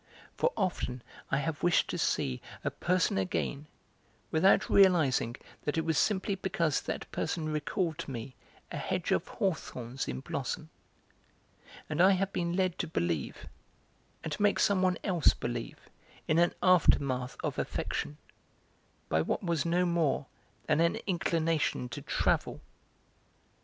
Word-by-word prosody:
For 485 - +2
often 130 -10 -2 0.3
I 135 - +2
have 145 +1 -2
wished 175 -1 +3
to - - -2
see 65 -1 0 0.2
a - - 0
person 180 - +1
again 140 +10 -2 0.6
without 175 +5 +4
realising 160 -11 +4 0.3
that 150 +2 -1
it 160 - 0
was 160 -1 +1
simply 200 -1 +1
because 170 -5 0
that - - -5
person 155 -2 -2
recalled 155 +2 -1
to 165 - -5
me 130 0 -6 0.4
a - - -4
hedge - - -2
of - - +1
hawthorns 130 -8 -3
in 65 0 -4
blossom; - - -4 1.2
and 155 +2 0
I 190 +2 +7
have 195 +1 -1
been 170 -1 -1
led 185 -2 0
to 175 - -1
believe, 85 - -2 0.8
and 160 - -3
to - - -4
make 205 0 +4
some 200 -2 +3
one 185 -1 +2
else 175 -6 +3
believe 120 -1 -4 0.5
in 160 +1 +3
an 175 - +3
aftermath 140 -8 +3
of - - -2
affection, 75 +1 -3 0.9
by 80 - +2
what 80 - -1
was 170 -3 0
no 175 +2 +2
more 170 -5 +1 0.4
than 155 -1 +2
an 170 0 +3
inclination 165 -7 0
to - - -6
travel. - - 0
165 Hz, 145 wpm, -31 LUFS, 135-180 Hz, 1.2 s, I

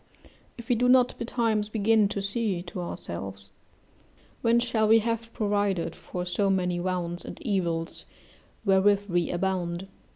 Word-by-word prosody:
If 235 - -10
we 250 - +3
do 245 +2 +2
not 250 -1 +5
betimes 225 -3 0
begin 215 0 +3
to 200 0 -3
see 200 -3 -1
to 180 0 -6
ourselves, 100 - -6 0.9
when 235 +1 +4
shall 230 -2 +1
we 225 +1 +7
have 230 +1 -2
provided 205 -6 0
for 180 -1 -6
so 190 +3 0
many 180 -2 +1
wounds 175 -1 -2
and - - -8
evils 170 -6 -2 0.6
wherewith 200 +1 +4
we 175 -2 +1
abound? 180 0 -2
195 Hz, 140 wpm, -27 LUFS, 175-225 Hz, 0.9 s, we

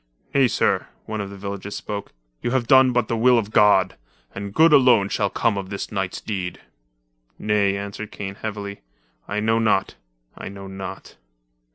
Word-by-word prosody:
"Nay, 135 -2 +5
sir," - - +1 0.2
one 110 -1 -4
of 100 - -5
the 100 - -10
villagers 100 +1 -6
spoke, 100 -1 -5 0.3
"you - - -1
have 125 -1 0
done 130 +1 +6
but 120 -3 +1
the 115 - -1
will 125 +2 +4
of 110 -2 -1
God, 100 -3 +4 0.4
and 100 0 -6
good 160 +8 +5
alone 125 -8 +5
shall 100 - 0
come 100 +1 0
of 95 -1 -7
this 100 -1 -5
night's 95 -3 -2
deed." 95 -4 -4 0.8
"Nay," 100 -2 +1
answered 100 +1 -6
Kane 95 -1 -6
heavily. 100 -2 -5 0.5
"I 105 - -2
know 110 +1 +2
not 105 -4 +1 0.2
— - - -48
I - - -7
know 100 0 -9
not." 95 -1 -8
100 Hz, 180 wpm, -23 LUFS, 100-115 Hz, 0.8 s, done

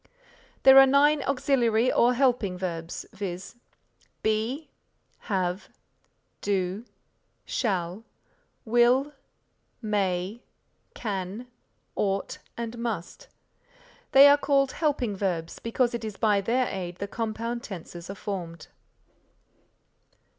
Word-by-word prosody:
There 270 0 +9
are 270 - +8
nine 285 +2 +4
auxiliary 250 -3 +2
or 245 +1 +4
helping 240 -8 +1
verbs, 170 -2 -5
viz., 190 +3 -6 0.7
Be, 225 +8 -1 0.6
have, 185 -1 -1 0.7
do, 195 +2 -1 0.6
shall, 190 -2 -2 0.6
will, 240 +5 +3 0.7
may, 200 0 -1 0.5
can, 200 +1 -4 0.5
ought, 195 -1 -1 0.2
and 235 0 -5
must. 230 - -5 0.8
They 275 +1 +9
are 285 0 +6
called 275 -2 +2
helping 275 -9 -1
verbs, 175 -4 -3
because 240 +1 0
it 235 - -4
is 215 -2 -5
by 210 -3 +2
their 245 +5 +1
aid 180 -2 -5
the 200 +3 -5
compound 230 +2 -3
tenses 175 -3 -9
are 195 - -5
formed. 175 -5 -6
220 Hz, 100 wpm, -27 LUFS, 190-250 Hz, 0.8 s, There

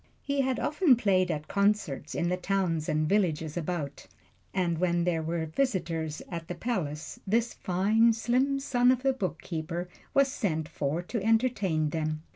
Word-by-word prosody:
He 280 -1 0
had 260 -1 0
often 300 -3 +4
played 190 -6 +2
at 155 -2 -3
concerts 200 -8 0
in 170 - 0
the 180 - +1
towns 180 -4 -1
and 155 0 +1
villages 160 -6 +1
about, 160 -4 -4 0.4
and 175 -4 0
when 175 -1 +2
there 170 -2 +1
were 165 +1 -2
visitors 165 - -1
at 170 -1 -6
the 175 - -4
palace 170 -8 -3
this 230 +4 +1
fine, 210 +6 +3
slim 255 +5 +1
son 250 -2 +2
of 255 0 +2
the 270 -1 +3
bookkeeper 170 - -4 0.3
was 275 -1 +4
sent 160 - -1
for 155 +4 -2
to 225 +4 -3
entertain 210 -9 +2
them. 155 -1 -2
180 Hz, 160 wpm, -29 LUFS, 160-230 Hz, 0.4 s, often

